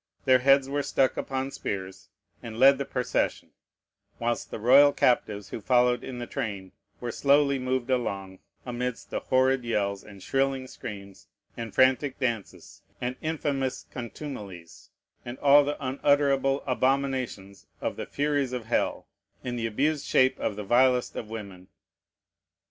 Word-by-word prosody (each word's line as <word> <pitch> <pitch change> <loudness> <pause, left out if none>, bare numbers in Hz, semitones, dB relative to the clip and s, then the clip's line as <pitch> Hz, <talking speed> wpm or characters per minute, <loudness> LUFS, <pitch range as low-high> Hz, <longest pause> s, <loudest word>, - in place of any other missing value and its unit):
Their 130 -1 +5
heads 135 +1 +4
were 145 +1 -1
stuck 135 -1 +1
upon 135 0 -3
spears, 95 -5 -6 0.3
and 110 -1 -8
led 135 +2 +6
the 140 - -2
procession; 125 -1 -2 0.7
whilst 120 0 -2
the - - -5
royal 135 +6 +6
captives 105 -5 +1
who - - -6
followed 125 +3 +3
in 130 - -6
the 120 - -4
train 100 -5 -5 0.3
were 120 -1 -4
slowly 140 +1 +3
moved 130 0 -2
along, 95 -7 -2 0.3
amidst 125 -1 -4
the - - -1
horrid 130 0 +2
yells, 100 -4 -1
and 100 -2 -13
shrilling 135 -1 0
screams, 100 -7 -9 0.3
and 115 -3 -7
frantic 130 +1 +3
dances, 120 -6 -4 0.2
and 125 +1 -3
infamous 145 -4 -2
contumelies, 105 - -8 0.3
and 120 +1 -7
all 145 0 +6
the 145 +1 -3
unutterable 140 0 +1
abominations 130 -7 -1
of - - -3
the - - -6
furies 145 -3 -1
of 125 -3 -4
hell, 115 - -1 0.4
in 125 -1 -3
the 115 -1 -2
abused 145 +7 -1
shape 130 0 +3
of 105 - -2
the 105 - -5
vilest 125 +3 +3
of 110 - -6
women. 100 -5 -8
125 Hz, 145 wpm, -27 LUFS, 110-135 Hz, 0.7 s, led